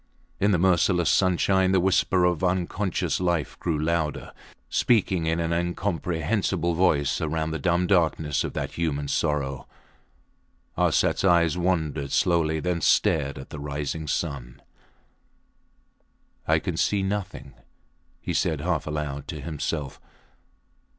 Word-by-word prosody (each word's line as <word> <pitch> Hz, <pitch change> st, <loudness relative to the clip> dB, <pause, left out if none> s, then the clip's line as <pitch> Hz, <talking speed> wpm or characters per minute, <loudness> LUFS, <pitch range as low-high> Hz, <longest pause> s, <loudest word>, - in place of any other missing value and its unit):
In 100 Hz, -, +3 dB
the 95 Hz, -, +3 dB
merciless 90 Hz, -2 st, +3 dB
sunshine 95 Hz, 0 st, +2 dB
the 95 Hz, -, +4 dB
whisper 95 Hz, 0 st, +2 dB
of 90 Hz, -1 st, 0 dB
unconscious 90 Hz, +1 st, -1 dB
life 85 Hz, -4 st, -1 dB
grew 85 Hz, -3 st, -1 dB
louder, 80 Hz, -1 st, -2 dB, 0.3 s
speaking 95 Hz, -8 st, +1 dB
in 80 Hz, +1 st, 0 dB
an 85 Hz, 0 st, -1 dB
incomprehensible 85 Hz, 0 st, -1 dB
voice 80 Hz, -5 st, +1 dB
round 80 Hz, 0 st, -2 dB
the 80 Hz, -, -3 dB
dumb 85 Hz, +4 st, +1 dB
darkness 80 Hz, -6 st, +1 dB
of -, -, -4 dB
that -, -, -3 dB
human 75 Hz, -4 st, -2 dB
sorrow. 70 Hz, -2 st, -1 dB, 1.1 s
Arsats -, -, +2 dB
eyes 85 Hz, -3 st, +4 dB
wandered 80 Hz, -6 st, -1 dB
slowly, 80 Hz, -3 st, +2 dB
then 85 Hz, +1 st, -2 dB
stared 70 Hz, -2 st, +2 dB
at 65 Hz, -, -10 dB
the 75 Hz, -, -7 dB
rising 75 Hz, +2 st, -4 dB
sun. 70 Hz, -5 st, -4 dB, 1.8 s
I -, -, +4 dB
can -, -, -3 dB
see 100 Hz, -2 st, +1 dB
nothing, 95 Hz, -9 st, -4 dB, 0.7 s
he -, -, -4 dB
said 75 Hz, -2 st, 0 dB
half 85 Hz, 0 st, -1 dB
aloud 75 Hz, -2 st, -4 dB
to -, -, -6 dB
himself. 75 Hz, -3 st, -4 dB
85 Hz, 125 wpm, -25 LUFS, 75-90 Hz, 1.8 s, the